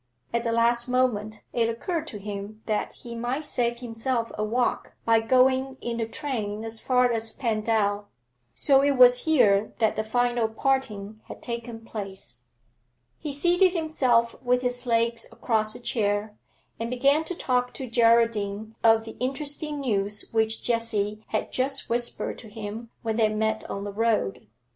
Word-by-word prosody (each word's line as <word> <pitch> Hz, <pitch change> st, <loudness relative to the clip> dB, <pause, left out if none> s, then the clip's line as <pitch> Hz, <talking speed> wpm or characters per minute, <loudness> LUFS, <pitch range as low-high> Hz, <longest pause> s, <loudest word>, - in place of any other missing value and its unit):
At 235 Hz, -, +1 dB
the 230 Hz, -, 0 dB
last 235 Hz, +1 st, +2 dB
moment 220 Hz, -4 st, 0 dB
it 230 Hz, -1 st, +2 dB
occurred 320 Hz, +8 st, -3 dB
to 215 Hz, -, -6 dB
him 205 Hz, +1 st, -7 dB
that 215 Hz, -1 st, -1 dB
he 235 Hz, -, -10 dB
might 245 Hz, +6 st, -3 dB
save 240 Hz, -3 st, -1 dB
himself 230 Hz, 0 st, -2 dB
a 215 Hz, -, -2 dB
walk 240 Hz, +3 st, -1 dB
by 230 Hz, -1 st, +5 dB
going 260 Hz, +3 st, +3 dB
in 235 Hz, -1 st, -4 dB
the 225 Hz, -1 st, -1 dB
train 225 Hz, -5 st, -3 dB
as 225 Hz, 0 st, -3 dB
far 250 Hz, 0 st, +3 dB
as 225 Hz, -1 st, 0 dB
Pendal. 215 Hz, -3 st, 0 dB, 0.5 s
So 270 Hz, -, +4 dB
it 280 Hz, -1 st, +2 dB
was 250 Hz, 0 st, +6 dB
here 220 Hz, -10 st, +3 dB
that 220 Hz, -2 st, +2 dB
the 220 Hz, -, -1 dB
final 240 Hz, +1 st, +1 dB
parting 220 Hz, -4 st, -2 dB
had -, -, -10 dB
taken 235 Hz, -1 st, -5 dB
place. 190 Hz, -, -7 dB, 0.8 s
He 300 Hz, -, -4 dB
seated 350 Hz, +6 st, +4 dB
himself 255 Hz, -9 st, +2 dB
with 250 Hz, 0 st, +1 dB
his 245 Hz, 0 st, -2 dB
legs 230 Hz, 0 st, +1 dB
across 215 Hz, -2 st, 0 dB
a -, -, -8 dB
chair, 210 Hz, -3 st, -1 dB, 0.4 s
and 230 Hz, 0 st, -3 dB
began 275 Hz, +5 st, +3 dB
to 360 Hz, -, -4 dB
talk 250 Hz, -5 st, 0 dB
to 265 Hz, -, -4 dB
Geraldine 230 Hz, -2 st, +2 dB
of 225 Hz, -1 st, +5 dB
the 225 Hz, -, -9 dB
interesting 290 Hz, +3 st, -2 dB
news 205 Hz, -4 st, 0 dB
which 220 Hz, 0 st, 0 dB
Jessie 215 Hz, -3 st, 0 dB
had 215 Hz, -, -2 dB
just 270 Hz, +2 st, -1 dB
whispered 240 Hz, 0 st, -1 dB
to 225 Hz, -, -11 dB
him 220 Hz, +2 st, -7 dB
when 225 Hz, -1 st, -1 dB
they 220 Hz, -2 st, +4 dB
met 220 Hz, 0 st, -1 dB
on 200 Hz, -, -4 dB
the 205 Hz, 0 st, -5 dB
road. 210 Hz, -, 0 dB
230 Hz, 160 wpm, -26 LUFS, 215-250 Hz, 0.8 s, was